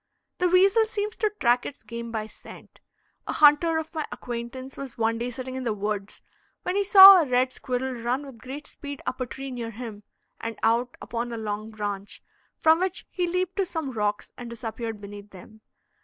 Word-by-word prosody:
The 360 -1 +3
weasel 390 +5 +5
seems 425 0 -3
to 430 - +1
track 245 0 +3
its 285 - -8
game 235 +1 -7
by 220 -2 -3
scent. 220 - -14 0.5
A - - -2
hunter 305 +2 +5
of 320 +1 -4
my 315 -2 -2
acquaintance 250 +2 -6
was 275 -3 -8
one 230 0 +1
day 240 +1 -2
sitting 255 +1 -6
in 260 0 -4
the 225 -3 -1
woods, 205 0 -4 0.4
when 360 - -1
he 405 - +2
saw 390 -1 +11
a 305 - -1
red 255 +1 +2
squirrel 255 +1 -3
run 245 +4 -2
with 265 -5 -12
great 270 +5 -8
speed 285 -1 -8
up 255 +1 -3
a 255 - -1
tree 270 +4 -7
near 240 -2 -4
him, 225 -2 -8 0.4
and 230 -1 -5
out 235 +2 +1
upon 235 +1 -4
a 230 - -4
long 215 0 -4
branch, 205 -2 -5 0.3
from 320 +1 +4
which 370 0 -2
he 360 -2 -1
leaped 365 +2 -1
to 390 - +2
some 320 -6 -4
rocks, 210 -3 -2
and 240 -1 -7
disappeared 225 -1 -5
beneath 205 0 -10
them. 205 +3 -14
250 Hz, 200 wpm, -26 LUFS, 225-310 Hz, 0.5 s, saw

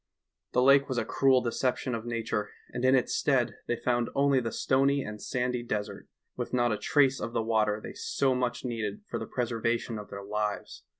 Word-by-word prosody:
The 125 - +3
lake 140 +1 +5
was 130 - -2
a - - 0
cruel 135 -2 +3
deception 125 +1 -1
of 115 0 -4
nature, 115 -2 -2 0.2
and 125 +1 -3
in 130 +1 +5
its 130 - +1
stead 130 -4 +1
they 120 - +1
found 120 0 0
only 140 -1 +4
the 115 -2 -3
stony 135 +3 +2
and 105 -1 -7
sandy 125 -1 -1
desert, 110 -3 -4 0.3
with - - -5
not 120 -1 +2
a - - -1
trace 135 +3 +3
of 115 - -4
the 115 - 0
water 110 -2 +1
they - - -8
so 455 - 0
much 125 0 -2
needed 115 - -3
for - - -3
the - - -5
pres 125 -2 -2
ervation 115 0 -1
of 105 - -14
their 100 0 -7
lives. 105 0 -3
120 Hz, 205 wpm, -29 LUFS, 110-130 Hz, 0.3 s, lake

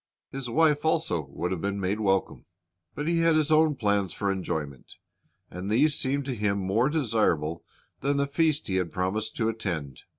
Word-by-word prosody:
His 135 -2 -5
wife 150 +2 +3
also 155 - 0
would 85 +6 -4
have 90 -3 -2
been 100 0 -2
made 100 +3 -1
welcome. 95 -2 0 0.5
But 145 - -3
he 170 0 +2
had 165 -1 +4
his 155 -1 +2
own 155 -1 +4
plans 100 -6 0
for 100 -1 -1
enjoyment, 75 -8 -4 0.6
and 90 +3 -5
these 140 +8 +3
seemed 140 0 -1
to 135 - -2
him 105 -3 0
more 100 +7 +1
desirable 110 - 0 0.4
than 140 +1 0
the 140 - +2
feast 155 +1 +1
he 95 - 0
had 90 -3 -1
promised 95 +4 -2
to 110 - 0
attend. 85 - -3
110 Hz, 185 wpm, -27 LUFS, 95-145 Hz, 0.6 s, had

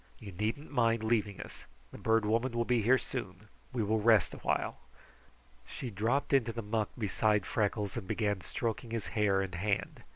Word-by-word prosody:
You 105 -3 -9
needn't 110 - -3
mind 115 -4 +2
leaving 110 -3 0
us. - - -11 0.3
The - - -10
Bird 110 -1 +2
Woman 115 +4 +1
will 120 0 0
be 120 -1 +2
here 125 +5 +5
soon. - - -6 0.2
We 120 -3 -1
will 110 +1 +1
rest 110 -3 +4
awhile." - - -1 0.9
She 125 - -6
dropped 115 +9 0
into 120 -4 +3
the 115 0 -5
muck 105 0 -1
beside 105 -2 +1
Freckles 105 -2 -1
and 95 - -5
began 105 -3 0
stroking 115 +4 -3
his 115 -2 -3
hair 100 -3 +3
and 95 -2 -6
hand. 100 +2 -1
110 Hz, 175 wpm, -32 LUFS, 105-115 Hz, 0.9 s, here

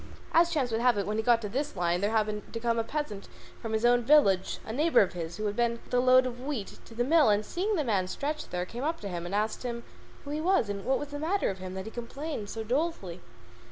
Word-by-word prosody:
As 335 +1 +5
chance 285 -8 0
would 225 +1 0
have 245 -3 +4
it, 200 - 0
when 210 +1 -2
he - - +2
had 220 - -15
got 235 -1 +5
to - - -2
this 280 +7 -3
line 175 0 0
there 205 - +2
happened 215 -1 -1
to 230 - -3
come 230 0 0
by - - +2
a - - -4
peasant 250 -6 -4 0.3
from 225 -2 -4
his 220 +2 +1
own 245 0 +5
village, 225 -9 +4
a 220 - -5
neighbour 310 +6 +4
of 195 - +1
his, 170 -1 -5
who 215 - -3
had 205 0 -1
been 235 0 +2
with 235 - -13
a 250 - +4
load 255 0 +6
of 245 -1 -5
wheat 260 -7 -5
to 225 - -13
the 240 - +1
mill, 305 0 +5
and 210 0 +2
he, - - -14
seeing 405 +4 0
the 310 - +1
man 200 -7 0
stretched 295 +9 -4
there, 180 0 -2
came 240 +7 -6
up 325 +3 -1
to 205 - -5
him 175 -1 -4
and 195 - -3
asked 215 +1 -1
him 235 -1 -4 0.4
who 285 - -7
he 300 +1 -2
was 355 - +2
and 200 -1 -4
what 265 - +2
was 290 - -6
the 290 0 -6
matter 360 +6 0
with 190 -1 -5
him 185 0 -6
that 190 0 -5
he 220 - -7
complained 240 -1 -5
so 225 - -4
dolefully. 235 - -2
235 Hz, 295 wpm, -29 LUFS, 205-290 Hz, 0.4 s, load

